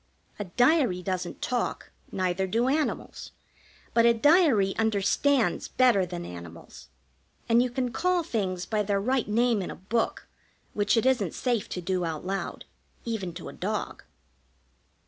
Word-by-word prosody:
A 205 - -3
diary 245 - +2
doesn't 185 -2 -4
talk, 245 -1 -2 0.2
neither 185 0 -1
do 230 +6 +1
animals; 295 +3 -2 0.6
but 230 - +4
a 235 0 +5
diary 270 - +4
understands 220 +1 +1
better 235 -8 +3
than 175 -1 -6
animals, 85 -1 -11 0.6
and 230 +1 +5
you 250 - 0
can 245 0 -2
call 360 +5 +1
things 190 - -2
by 215 -1 0
their 200 -1 0
right 250 +4 0
name 230 0 +2
in 185 - -4
a - - -6
book 225 +5 -2 0.5
which 205 +2 +1
it 225 - +2
isn't 240 -10 +1
safe 240 -5 -1
to 180 - -4
do 180 +1 -1
out 160 -1 -4
loud, 195 +1 -4 0.4
even 220 -6 -3
to - - -8
a - - -8
dog. - - -4
215 Hz, 150 wpm, -27 LUFS, 185-245 Hz, 0.6 s, a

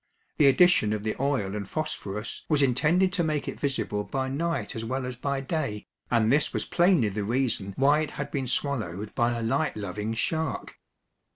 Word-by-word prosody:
The 145 - +7
addition 135 -6 +5
of 105 -1 -3
the 110 - -1
oil 130 -9 0
and 100 -2 -5
phosphorus 105 -9 -4
was 150 -3 +3
intended 165 +9 +3
to 175 - +1
make 155 -2 -1
it - - -5
visible 135 -7 -1
by 130 +3 -2
night 165 +5 -2
as 110 - -4
well 130 +3 -2
as 125 0 -4
by 140 +2 -2
day, 135 -7 -3 0.2
and 115 -1 +3
this 145 +2 +2
was - - -1
plainly 175 - +3
the 100 +1 -3
reason 115 -3 -1
why 145 +3 +4
it 155 -2 -1
had 140 - -4
been 135 -3 -2
swallowed 110 - -2
by 120 0 +1
a 115 - -3
light 115 +6 0
loving 105 +2 -3
shark. 160 +5 -2
130 Hz, 190 wpm, -27 LUFS, 110-150 Hz, 0.2 s, The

